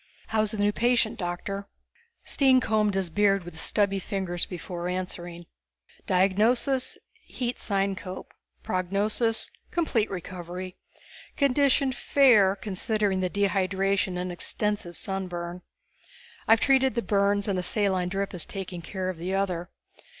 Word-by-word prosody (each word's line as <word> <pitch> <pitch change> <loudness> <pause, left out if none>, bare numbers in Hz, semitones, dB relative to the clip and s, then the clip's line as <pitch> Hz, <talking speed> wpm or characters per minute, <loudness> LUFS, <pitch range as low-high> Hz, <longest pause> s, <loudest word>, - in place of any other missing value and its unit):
"How's 215 -1 +1
the 215 - -4
new 205 0 +2
patient, 235 -1 +1
Doctor?" 195 +3 -4 0.6
Stine 265 -2 +4
combed 215 -4 +1
his 190 -3 0
beard 195 +1 +3
with 170 -2 -9
stubby 195 +1 +2
fingers 185 -2 -2
before 175 -1 -5
answering. 175 -1 -5 0.6
"Diagnosis: 220 +8 +2 0.2
heat 245 -1 -4
syncope. 195 -2 -2 0.3
Prognosis: 205 +5 0 0.2
complete 275 -11 0
recovery. 180 0 -6 0.6
Condition 280 -1 +3
fair, 240 -8 +4
considering 205 0 0
the 185 -1 0
dehydration 195 -1 +1
and 180 0 -3
extensive 190 0 -1
sunburn. 180 -2 -4 0.9
I've 225 0 +6
treated 265 -3 +3
the 235 - 0
burns, 200 +1 +2
and 195 -2 0
a - - 0
saline 185 -1 +1
drip 195 +1 -2
is 180 - -1
taking 185 -3 -6
care 185 +2 -4
of 185 -2 -3
the 180 +3 -2
other. 180 -3 -1
195 Hz, 125 wpm, -27 LUFS, 180-215 Hz, 0.9 s, I've